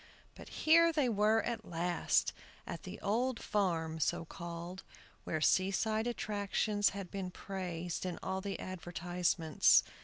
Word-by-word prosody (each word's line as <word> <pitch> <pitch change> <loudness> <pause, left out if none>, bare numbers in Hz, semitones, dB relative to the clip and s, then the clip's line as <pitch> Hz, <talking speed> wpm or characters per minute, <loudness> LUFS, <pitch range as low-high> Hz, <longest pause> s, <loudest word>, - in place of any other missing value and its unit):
But - - -12 0.2
here 335 +2 +7
they 295 -6 +2
were 215 +1 +3
at 230 -2 -3
last, 175 0 +1 0.3
at - - -6
the - - -8
"Old 235 +4 0
Farm," 165 -6 0
so 160 - 0
called, 170 +2 -7 0.4
where 155 - -1
seaside 215 +6 +2
attractions 205 -2 0
had 195 -3 -7
been 190 -2 -3
praised 180 -3 -4
in 180 -2 -3
all 190 0 -2
the 200 0 -4
advertisements. 175 -2 +2
190 Hz, 130 wpm, -34 LUFS, 175-215 Hz, 0.4 s, here